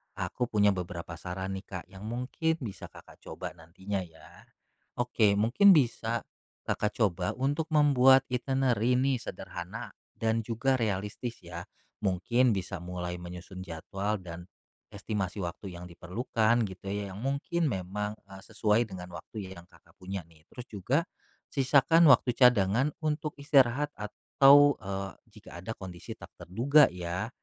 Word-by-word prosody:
aku 125 - -2
punya 105 -1 +4
beberapa 85 -2 -5
saran 95 +1 -4
nih, 95 - -7
Kak, 90 -3 -7
yang 95 +1 -11
mungkin 125 +8 -1
bisa 110 -7 -6
Kakak - - -15
coba - - -6
nantinya 95 +4 -5
ya. 80 -2 -16 0.6
Oke, 115 -4 +3
mungkin 125 - +6
bisa 115 -4 +1 0.4
Kakak 105 0 0
coba 90 -6 0
untuk 145 +5 -1
membuat 135 -3 +6
itinerary 125 -2 +1
nih, 135 0 +2
sederhana 120 - -7 0.2
dan 115 0 0
juga 125 +4 +1
realistis 110 +2 -3
ya. 85 0 -8 0.4
Mungkin 110 +6 +2
bisa 95 -2 -4
mulai 90 0 -5
menyusun 90 +2 -8
jadwal 95 +5 -3
dan 90 0 -9 0.4
estimasi 100 -1 -4
waktu 90 0 -5
yang 90 - -9
diperlukan 110 +6 0
gitu 95 0 -8
ya, 100 -1 -3
yang 95 - -8
mungkin 155 +5 0
memang, 105 +2 -3
eee, 95 -1 -11
sesuai 110 +1 +1
dengan 90 -2 -8
waktu 100 -4 -8
yang 85 - -11
Kakak - - -23
punya 95 +1 -5
nih. 80 -2 -23
Terus 125 - -8
juga 110 - 0 0.5
sisakan 140 +4 +5
waktu 125 -1 +4
cadangan 125 +2 +4
untuk 150 0 -2
istirahat 140 -1 +3
atau, 140 +7 +5
eee, 95 -1 -4 0.2
jika - - -13
ada 105 +5 -6
kondisi 90 -2 -8
tak - - -11
terduga 135 - +4
ya, 90 +4 -4
105 Hz, 140 wpm, -29 LUFS, 95-125 Hz, 0.6 s, mungkin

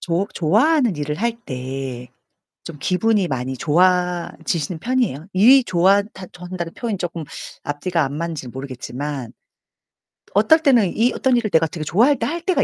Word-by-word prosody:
조 175 +3 -1
좋아하는 230 - +3
일을 150 0 -3
할 235 +3 0
때 130 -1 -6 0.6
좀 165 -3 -8
기분이 195 +5 +1
많이 130 -2 -3
좋아지시는 175 0 0
편이에요? 235 - -1
이 250 +8 +6
좋아한다 190 0 +1
좋아한다는 175 -1 -7
표현이 225 -4 -3
쪼끔 170 -2 -4 0.4
앞뒤가 160 +3 -1
안 135 - -3
맞는지 160 -4 -4
모르겠지만 130 0 -6 1.0
어떨 265 +11 +4
때는 235 -10 +3
이 240 +3 +3
어떤 255 -2 +2
일을 220 -4 -1
내가 160 0 +3
되게 160 0 -6
좋아할 235 - +3
때 - - -2
할 335 +3 -3
때가 370 +1 +1
175 Hz, 335 characters per minute, -21 LUFS, 150-220 Hz, 1.0 s, 이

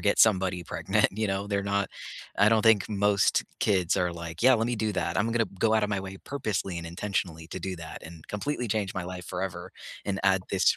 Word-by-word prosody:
get 100 - +2
somebody 95 -4 +4
pregnant. - - +1
You 110 0 +1
know? 95 +1 -1
They're 100 -1 0
not 100 0 0 0.5
I 100 +2 +6
don't 110 -1 +4
think 110 -4 +5
most 100 -1 +2 0.2
kids 95 -4 +2
are 90 -1 +1
like, 85 +2 -7
"Yeah, 130 +1 +7
let 115 -1 +1
me 120 - 0
do 110 0 0
that. 85 -2 -1
I'm 110 +4 +1
gonna 115 -1 +3 0.2
go 110 -1 +4
out 110 -1 +3
of 105 - -2
my 100 -2 0
way 95 0 -7
purposely 105 -9 -2
and 85 - -6
intentionally 85 -3 -3
to 95 - -6
do 95 +1 -4
that 80 -2 -8
and 80 -1 -11
completely 125 +4 -2
change 100 -2 -1
my 95 - -3
life 90 0 -7
forever 90 0 -4 0.3
and 95 -1 -1
add 95 -1 +4
this - - +3
95 Hz, 230 wpm, -28 LUFS, 90-105 Hz, 0.5 s, Yeah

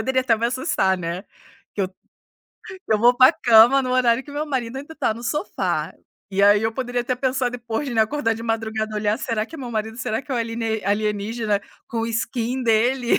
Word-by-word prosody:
poderia 260 +3 +1
até 240 -3 +2
me 230 - +1
assustar, 235 - 0
né, 180 +2 -4 0.5
que 205 - -3
eu 185 - -2 1.0
eu 220 - +4
vou 240 +3 +6
pra 255 +4 +7
cama 245 -2 +6
no 255 - -3
horário 250 -1 +3
que 285 - -13
meu 295 +2 -3
marido 255 -4 -3
ainda 285 +4 -8
tá 220 - 0
no 235 +2 -9
sofá, 300 - -2 0.4
e 195 - 0
aí 205 +1 +5
eu 225 - +1
poderia 245 0 -2
até 250 +1 -2
pensar 260 0 0
depois 240 +2 -4
de 240 -3 -2
acordar 225 +1 +1
de 225 - -8
madrugada, 220 -1 -2
olhar: 210 +2 0
"Será 230 -5 -2
que 320 +8 -11
é - - -11
meu 250 -3 -6
marido? 220 0 -3
Será 225 0 -2
que 275 - -15
é - - 0
o - - 0
aliene 225 -1 -2
alienígena 210 +1 -1 0.3
com 230 -1 -2
o 230 - -1
skin 235 +2 -2
dele". 240 +2 +2
230 Hz, 215 wpm, -22 LUFS, 220-255 Hz, 1.0 s, pra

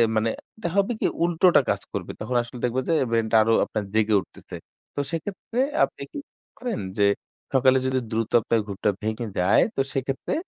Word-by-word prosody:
মানে 110 +1 +2 0.3
এতে 220 - -3
হবে 200 +3 +3
কি - - 0 0.2
উল্টোটা 175 +1 +5
কাজ - - 0
করবে। - - -4
তখন 120 +4 -3
আসলে 120 +1 -9
দেখবা 125 +2 0
যে 165 - +3 0.2
ব্রেইন 115 -1 +1
টা - - +3
আরো 115 - +2
আপনার 105 - -3
জেগে 110 -1 +3
উঠতেছে। - - -12 0.4
তো - - -2
সেক্ষেত্রে 195 +7 -4 0.2
আপনি - - -2
কি 305 - -7 0.4
করেন 245 -3 -3 0.2
যে 100 - +4 0.5
সকালে 130 0 +5
যদি 130 0 +1
দ্রুত 115 0 -1
আপনার 115 +1 +1
ঘুমটা 100 0 -1
ভেঙে 110 +2 -2
যায়, 90 +3 +4
তো - - +2
সেক্ষেত্রে 135 0 -2
125 Hz, 185 wpm, -25 LUFS, 110-165 Hz, 0.5 s, উল্টোটা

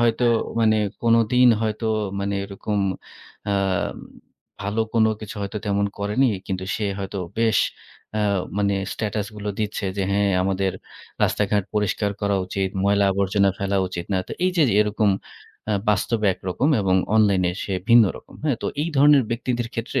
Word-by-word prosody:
হয়তো 120 +1 +2 0.8
কোনদিন 115 +2 +4
হয়তো 110 +1 -1 0.3
মানে 100 0 -2
এরকম 100 +1 -3 0.7
আ - - +1 1.1
ভালো 105 +3 -1
কোনো 110 -1 +4
কিছু 110 0 -8
হয়তো 100 +1 -4
তেমন 100 0 +1
করেনি। 105 +6 +2 0.2
কিন্তু 95 -1 -3
সে 105 - -2
হয়তো 95 0 -4 0.2
বেশ 115 -3 +3 0.6
আ - - +1 0.4
মানে 100 -1 +2 0.2
স্ট্যাটাস 105 -1 -2
গুলো 105 0 -3
দিচ্ছে 105 -1 -2
যে, 100 - 0
"হ্যাঁ 100 0 +2
আমাদের 95 0 0 0.5
রাস্তাঘাট 105 0 +1
পরিষ্কার 105 0 0
করা 100 -1 +1
উচিত, 95 0 -1
ময়লা 100 0 +3
আবর্জনা 100 0 +2
ফেলা 100 0 0
উচিত 85 -1 -5
না।" 95 - +2
তো - - -6
এইযে 180 -3 +2
যে 100 - +1
এরকম 105 0 +2 0.6
আ - - +1 0.2
বাস্তবে 105 +2 0
একরকম 95 - -1
এবং 95 -1 +2 0.2
অনলাইনে 95 -4 +3
সে 95 - -3
ভিন্নরকম। 115 -4 +3 0.3
তো - - -1 0.2
এই 165 - -1
ধরনের 145 -2 +6
ব্যক্তিদের 120 0 -2
ক্ষেত্রে 120 +3 -2
105 Hz, 145 wpm, -23 LUFS, 100-115 Hz, 1.1 s, ধরনের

